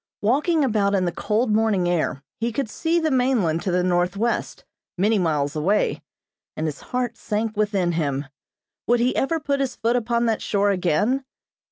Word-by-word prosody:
Walking 295 Hz, -, +2 dB
about 205 Hz, -4 st, +1 dB
in 185 Hz, -2 st, +1 dB
the 175 Hz, -, 0 dB
cold 215 Hz, +5 st, 0 dB
morning 210 Hz, -5 st, +2 dB
air, 160 Hz, -5 st, -1 dB, 0.2 s
he 230 Hz, +1 st, -1 dB
could 255 Hz, +2 st, -2 dB
see 335 Hz, +6 st, 0 dB
the 320 Hz, -2 st, 0 dB
mainland 245 Hz, -11 st, +2 dB
to 190 Hz, -, -2 dB
the 180 Hz, 0 st, +1 dB
northwest, 185 Hz, +6 st, -1 dB, 0.3 s
many 210 Hz, +3 st, +2 dB
miles 150 Hz, -4 st, 0 dB
away, 185 Hz, +8 st, +1 dB, 0.6 s
and 155 Hz, -, -1 dB
his 150 Hz, -2 st, -4 dB
heart 245 Hz, -2 st, -3 dB
sank 215 Hz, +1 st, -2 dB
within 205 Hz, -4 st, +1 dB
him. 145 Hz, -4 st, -1 dB, 0.6 s
Would 240 Hz, 0 st, +3 dB
he 245 Hz, +2 st, +1 dB
ever 325 Hz, +4 st, 0 dB
put 285 Hz, -2 st, -1 dB
his 270 Hz, -2 st, -1 dB
foot 230 Hz, +2 st, 0 dB
upon 235 Hz, 0 st, +1 dB
that 225 Hz, -2 st, 0 dB
shore 200 Hz, 0 st, +1 dB
again? 200 Hz, -, +1 dB
210 Hz, 175 wpm, -23 LUFS, 180-245 Hz, 0.6 s, Would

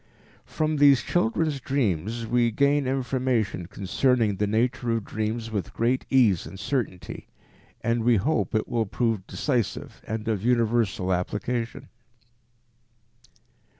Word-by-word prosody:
From 155 Hz, -1 st, -1 dB
these 140 Hz, -2 st, +6 dB
children's 155 Hz, -1 st, 0 dB
dreams 115 Hz, -, -1 dB
we 120 Hz, +1 st, +2 dB
gain 140 Hz, +4 st, +2 dB
information 125 Hz, -8 st, -1 dB
concerning 105 Hz, +2 st, +1 dB
the 105 Hz, -, 0 dB
nature 120 Hz, +3 st, 0 dB
of 105 Hz, -, -6 dB
dreams 110 Hz, +1 st, -3 dB
with 100 Hz, -6 st, -4 dB
great 120 Hz, +3 st, 0 dB
ease 115 Hz, -10 st, +3 dB
and 95 Hz, -, -10 dB
certainty, 115 Hz, -10 st, -3 dB, 0.5 s
and 115 Hz, 0 st, 0 dB
we 120 Hz, 0 st, +4 dB
hope 125 Hz, +4 st, 0 dB
it 110 Hz, -, 0 dB
will 115 Hz, -3 st, -1 dB
prove 110 Hz, -2 st, -1 dB
decisive 125 Hz, -8 st, -2 dB
and 110 Hz, +1 st, -4 dB
of 110 Hz, -4 st, 0 dB
universal 115 Hz, -6 st, +1 dB
application. 115 Hz, +6 st, -3 dB
115 Hz, 120 wpm, -26 LUFS, 105-130 Hz, 0.5 s, these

